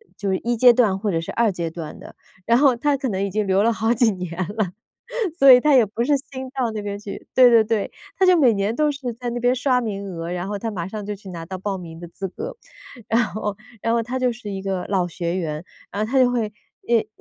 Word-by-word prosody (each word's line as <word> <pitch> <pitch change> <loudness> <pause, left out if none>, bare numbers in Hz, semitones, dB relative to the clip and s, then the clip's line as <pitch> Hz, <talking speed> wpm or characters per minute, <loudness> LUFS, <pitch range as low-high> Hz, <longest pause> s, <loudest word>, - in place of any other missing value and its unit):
就 200 0 -3
是 190 - +1
一 240 +4 -1
阶 245 +2 +7
段 225 -5 +2
或 205 +1 -1
者 165 - 0
是 165 - -5
二 230 -2 +2
阶 170 -3 -3
段 160 -2 -8
的。 - - -12 0.3
然 235 +1 +4
后 270 -2 +5
他 285 +4 +1
可 265 -1 -2
能 195 -2 -1
已 200 - -1
经 210 +2 -1
留 190 +1 +3
了 230 - +3
好 225 +1 +1
几 240 -2 +3
年 180 -3 -6 0.3
了， 195 -5 0 0.7
所 275 -4 +9
以 250 - +8
他 300 +2 +4
也 250 -3 +6
不 215 +3 -3
是 290 +3 +3
新 265 -1 -7
到 260 -3 -1
那 215 - -4
边 205 0 -4
去， 205 -1 -8
对 255 -1 +8
对 230 -1 +6
对。 215 -2 -1 0.3
他 385 - +4
就 365 -1 +6
每 260 -6 +5
年 200 +2 0
都 300 +3 +2
是 275 -4 -4
在 240 +1 -5
那 240 - -3
边 245 +1 +3
刷 255 0 +2
名 205 -4 -4
额， 170 -3 -5
然 180 +1 -3
后 205 0 -3
他 225 +3 -3
马 175 -5 -4
上 210 +1 -6
就 210 - -3
去 200 -1 -12
拿 170 -2 -7
到 190 - -5
报 195 +1 -3
名 165 -2 -9
的 175 - -8
资 195 +3 -5
格。 - - -7 0.5
然 230 +1 +3
后 210 -2 -4 0.3
然 230 - +1
后 235 - +2
他 245 +3 -3
就 250 -1 +1
是 225 -3 -8
一 195 -1 -5
个 190 -2 -2
老 190 -3 +1
学 170 0 -3
员， 155 -2 -4 0.3
然 210 +1 -1
后 215 - -6
他 265 - +3
就 255 -1 +5
会 225 -4 -1 0.3
遇 235 -2 +1
215 Hz, 290 characters per minute, -22 LUFS, 195-245 Hz, 0.7 s, 所